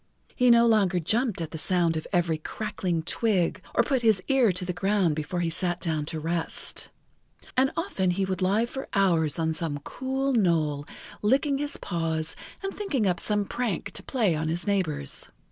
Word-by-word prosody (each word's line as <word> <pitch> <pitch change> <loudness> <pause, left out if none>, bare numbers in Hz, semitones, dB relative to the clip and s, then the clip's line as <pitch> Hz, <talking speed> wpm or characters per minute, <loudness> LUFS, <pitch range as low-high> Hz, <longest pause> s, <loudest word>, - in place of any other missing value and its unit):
He 250 -1 +4
no 235 0 +7
longer 200 -6 +3
jumped 220 - 0
at 160 - -4
the 160 - -5
sound 175 -2 +1
of 155 - -4
every 170 -4 +1
crackling 185 -2 -3
twig 200 -1 0
or 235 - +5
put 260 0 0
his 220 -4 +4
ear 260 -6 +4
to 180 0 -2
the 180 - -2
ground 190 -3 +1
before 155 +4 -2
he 170 - 0
sat 175 +1 -1
down 155 -4 -1
to 160 +1 -4
rest, 165 +1 -2 0.7
and 265 +1 +4
often 330 - 0
he 190 +2 +1
would 190 -1 -3
lie 200 +5 +3
for 265 +3 -6
hours 170 -7 +3
on 160 -1 0
some 160 -3 -2
cool 265 +1 -2
knoll 160 - +1 0.3
licking 275 +6 +2
his 290 0 -3
paws 165 -2 -2 0.3
and 390 - -3
thinking 295 - -1
up 180 -3 +1
some 205 +1 +1
prank 235 -5 -2
to - - -3
play 225 -10 +1
on 155 0 -1
his 170 +3 -1
neighbors. 185 - -1
185 Hz, 185 wpm, -27 LUFS, 165-230 Hz, 0.7 s, no